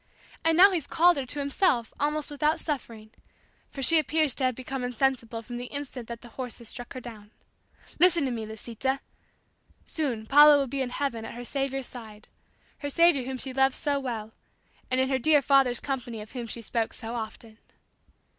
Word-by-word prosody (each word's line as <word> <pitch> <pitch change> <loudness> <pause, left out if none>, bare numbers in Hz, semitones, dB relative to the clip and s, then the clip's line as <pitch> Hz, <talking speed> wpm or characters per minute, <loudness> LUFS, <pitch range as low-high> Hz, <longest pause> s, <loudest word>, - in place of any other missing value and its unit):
And 325 0 +3
now 390 +3 +8
He's 330 -6 -2
called 350 0 +4
her 265 -2 -3
to 295 - -3
Himself 280 - +1
almost 295 +1 0
without 300 +2 +1
suffering, 230 -7 -5 0.6
for 270 - -6
she 325 +4 +6
appears 310 -2 +1
to 260 - 0
have 255 -2 +1
become 260 +1 -5
insensible 245 -2 -1
from 240 +1 -7
the 245 +1 -5
instant 275 -4 -5
that 235 -1 -7
the 240 - -12
horses 240 -1 -6
struck 245 -2 -6
her 255 - -6
down. 220 -4 -11 0.7
Listen 345 -3 +5
to 260 - -1
me, 225 -2 -4
Lisita! 235 +5 -3 0.9
Soon 255 -9 -2
Paula 295 +4 +8
will 280 - +1
be 270 +1 -3
in 255 - -1
heaven 245 -3 -3
at 225 - -8
her 245 0 -7
Saviour's 270 0 -2
side 220 -4 -10 0.5
her 285 - -4
Saviour 335 -4 +4
whom 260 0 -4
she 260 +1 -4
loved 265 0 +3
so 285 -1 0
well; 225 -5 -5 0.6
and 255 - +1
in 260 - +2
her 265 -1 0
dear 300 +3 +5
father's 270 -3 +3
company 250 -5 -4
of 210 0 -9
whom 245 -3 -5
she 230 +1 -4
spoke 225 +1 -1
so 230 -1 -7
often. 220 -1 -7
260 Hz, 195 wpm, -27 LUFS, 235-285 Hz, 0.9 s, now